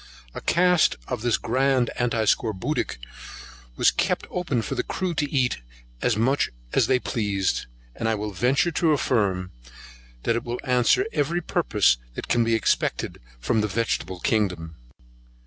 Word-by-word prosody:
A -, -, -6 dB
cask 180 Hz, -1 st, +3 dB
of 125 Hz, -3 st, -3 dB
this 120 Hz, -1 st, +2 dB
grand 130 Hz, 0 st, +1 dB
antiscorbutic 110 Hz, -, 0 dB, 0.8 s
was -, -, +4 dB
kept -, -, 0 dB
open 150 Hz, -10 st, -1 dB
for -, -, -3 dB
the -, -, 0 dB
crew 185 Hz, -2 st, -3 dB
to 145 Hz, -3 st, -1 dB
eat 130 Hz, -, +1 dB, 0.4 s
as 115 Hz, -3 st, +1 dB
much 130 Hz, +6 st, +2 dB
of -, -, -20 dB, 0.2 s
as -, -, +3 dB
they 130 Hz, -, +4 dB
pleased; 100 Hz, -, -1 dB, 0.3 s
and 115 Hz, -, -1 dB
I 110 Hz, -, +1 dB
will 105 Hz, 0 st, -4 dB
venture 135 Hz, -, +2 dB
to 160 Hz, -1 st, +2 dB
affirm, 100 Hz, -10 st, 0 dB, 0.7 s
that 115 Hz, -, +1 dB
it 120 Hz, -, -2 dB
will 120 Hz, +1 st, -4 dB
answer 125 Hz, -, +3 dB
every 165 Hz, +5 st, 0 dB
purpose 115 Hz, -, +2 dB, 0.2 s
that -, -, -6 dB
can 120 Hz, -, +2 dB
be 115 Hz, 0 st, +2 dB
expected 110 Hz, -, 0 dB, 0.2 s
from 110 Hz, -, +1 dB
the 105 Hz, -, 0 dB
vegetable 100 Hz, -3 st, -2 dB
kingdom. 90 Hz, -7 st, -1 dB
120 Hz, 155 wpm, -24 LUFS, 105-135 Hz, 0.8 s, was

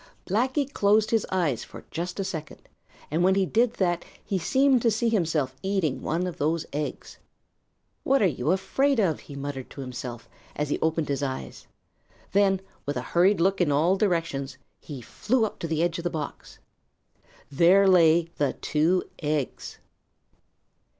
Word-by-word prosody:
Blacky 260 Hz, -, +1 dB
closed 210 Hz, +1 st, +3 dB
his 225 Hz, -3 st, +1 dB
eyes 170 Hz, -10 st, 0 dB
for -, -, -12 dB
just 175 Hz, +4 st, -4 dB
a -, -, 0 dB
second, 160 Hz, -5 st, -7 dB, 0.4 s
and 165 Hz, +3 st, +1 dB
when 190 Hz, +1 st, +4 dB
he 195 Hz, -1 st, +2 dB
did 230 Hz, +5 st, +2 dB
that 175 Hz, -4 st, 0 dB, 0.2 s
he 195 Hz, -, -1 dB
seemed 265 Hz, +8 st, +3 dB
to 230 Hz, -, +3 dB
see 230 Hz, +2 st, +1 dB
himself 160 Hz, -, 0 dB
eating 190 Hz, -8 st, -1 dB
one 170 Hz, +3 st, -1 dB
of 180 Hz, -, -6 dB
those 160 Hz, +2 st, 0 dB
eggs. 150 Hz, +1 st, -5 dB, 0.8 s
"What 275 Hz, +1 st, +2 dB
are 210 Hz, -, +3 dB
you 150 Hz, -5 st, 0 dB
afraid 235 Hz, +9 st, +1 dB
of?" 180 Hz, -7 st, +1 dB
he 140 Hz, -, -11 dB
muttered 140 Hz, -2 st, -5 dB
to 140 Hz, -, -9 dB
himself 125 Hz, -2 st, -7 dB, 0.3 s
as 150 Hz, -1 st, -2 dB
he -, -, -1 dB
opened 160 Hz, -1 st, 0 dB
his 140 Hz, -1 st, -2 dB
eyes. 135 Hz, -2 st, -5 dB, 0.6 s
Then 195 Hz, -1 st, +3 dB, 0.3 s
with 145 Hz, -, -1 dB
a -, -, -1 dB
hurried 185 Hz, +3 st, +4 dB
look 190 Hz, +2 st, +2 dB
in 160 Hz, -4 st, +2 dB
all 160 Hz, +6 st, +3 dB
directions, 165 Hz, -9 st, -1 dB, 0.2 s
he 140 Hz, -5 st, -8 dB
flew 230 Hz, -, 0 dB
up 215 Hz, -, -6 dB
to 165 Hz, -, -3 dB
the 160 Hz, 0 st, 0 dB
edge 170 Hz, -1 st, 0 dB
of -, -, -6 dB
the 175 Hz, -, 0 dB
box. 155 Hz, -4 st, -6 dB, 0.9 s
There 180 Hz, +7 st, +5 dB
lay 170 Hz, -2 st, +5 dB
the 145 Hz, -3 st, +1 dB
two 165 Hz, +4 st, +1 dB, 0.2 s
eggs! 150 Hz, -3 st, -3 dB
170 Hz, 170 wpm, -26 LUFS, 150-195 Hz, 0.9 s, There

